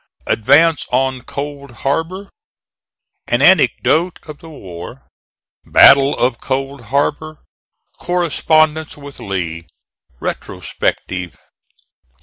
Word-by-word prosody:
ADVANCE 150 +7 +3
ON 130 0 0
COLD 140 +1 -7
HARBOR 165 +8 -2 1.0
AN - - +1
ANECDOTE 170 +3 +3
OF 150 -1 -10
THE 165 - -13
WAR 90 - -10 0.6
BATTLE 140 +1 +6
OF 120 -1 0
COLD 135 -1 -4
HARBOR 145 +5 -2 0.6
CORRESPONDENCE 160 -3 +1
WITH 140 -1 -12
LEE 85 -4 -4 0.5
RETROSPECTIVE. 90 -2 -4
140 Hz, 85 wpm, -17 LUFS, 125-155 Hz, 1.0 s, BATTLE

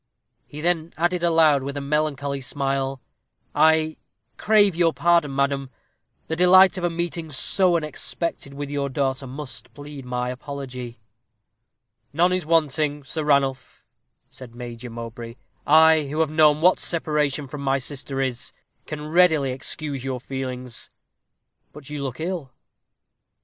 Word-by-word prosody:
He 150 - -8
then 170 -1 -1
added 175 +2 0
aloud, 160 -4 +4
with 140 +1 -5
a - - -1
melancholy 140 -1 -1
smile, 135 -1 -2 0.5
"I 160 +1 +3 0.4
crave 205 -4 +3
your 165 -1 +3
pardon, 170 -5 +2
madam; 140 -1 0 0.6
the 160 - -3
delight 185 +2 +6
of - - -7
a 175 - +2
meeting 170 -1 -4
so 175 +5 +3
unexpected 155 -2 -3
with 145 0 -5
your 140 -1 -1
daughter 135 0 -2
must 130 -1 -8
plead 145 -1 -9
my 125 0 -3
apology." 125 -3 -7 1.1
"None 175 +4 +3
is 185 -4 -2
wanting, 150 -2 +1
Sir 155 +4 -4
Ranulph," 140 -3 0 0.4
said 120 -3 -12
Major 120 0 -8
Mowbray. 115 0 -8 0.3
"I 160 0 +6
who 150 +3 -4
have 155 -2 0
known 155 -1 +4
what 180 +2 +5
separation 150 -4 -1
from 140 +2 -7
my 135 0 +1
sister 135 0 -3
is, 130 -3 -2 0.3
can 150 -1 -6
readily 160 -5 +3
excuse 135 +1 -5
your 130 -1 -3
feelings. 125 -2 -6 0.8
But 145 -1 -12
you 150 -1 -4
look 130 -2 -5
ill." 165 -5 -4
145 Hz, 140 wpm, -23 LUFS, 135-160 Hz, 1.1 s, delight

